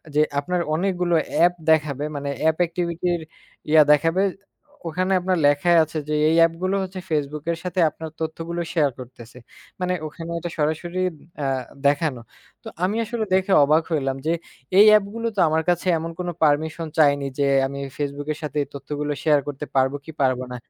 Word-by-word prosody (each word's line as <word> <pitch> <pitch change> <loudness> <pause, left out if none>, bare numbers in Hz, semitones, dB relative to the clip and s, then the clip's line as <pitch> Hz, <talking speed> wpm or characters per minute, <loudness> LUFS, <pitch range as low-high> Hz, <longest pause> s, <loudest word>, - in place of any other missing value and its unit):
যে 150 - +5 0.2
আপনার 180 +4 -2 0.2
অনেকগুলো 180 -1 0 0.2
অ্যাপ 175 +1 +4 0.2
দেখাবে 150 -2 +1
মানে 140 0 -4
অ্যাপ 160 0 +2
এক্টিভিটির 170 0 -2 0.5
ইয়া 155 -1 +8
দেখাবে, 165 +5 +3 0.6
ও - - -3
ওখানে 185 +3 0
আপনার 185 0 0
লেখাই 145 +5 +3
আছে 160 +1 -6
যে, - - 0 0.2
এই 165 - +2
অ্যাপগুলো 165 +3 +2
হচ্ছে 185 0 -6
Facebook 150 -1 -2
এর 165 - -3
সাথে 180 0 -3
আপনার 160 +1 -8
তথ্যগুলো 165 +2 -4
শেয়ার 150 -5 +2
করতেছে। 120 -1 -12 0.4
মানে, 180 0 0
ওখানে 165 +2 -8
এটা 175 +1 -5
সরাসরি 160 +4 -1 0.4
আ - - -1 0.4
দেখানো। 145 -3 +1 0.4
তো, - - -10 0.2
আমি 195 +4 +1
আসলে 230 0 -3
দেখে 190 +1 +1
অবাক 155 +3 +3
হইলাম 135 -4 0
যে, 160 - +1 0.5
এই 210 - +9
অ্যাপগুলো 215 +2 +2
তো - - -2
আমার 160 +1 +1
কাছে 175 +1 +1
এমন 165 +1 -5
কোনো 175 -1 -2
পারমিশন 155 +2 +1
চায়নি 145 -2 +4
যে, 140 - +3 0.2
আমি 140 +1 -7 0.2
Facebook 145 0 -4
এর 150 - -11
সাথে 150 0 -4
এই - - -11
তথ্যগুলো 150 +1 -4
শেয়ার 150 -2 +4
করতে 145 +1 -5
পারবো, 130 +1 +2
কি 160 - -8
পারব 130 -2 +2
না। - - -5
160 Hz, 175 wpm, -23 LUFS, 145-175 Hz, 0.6 s, এই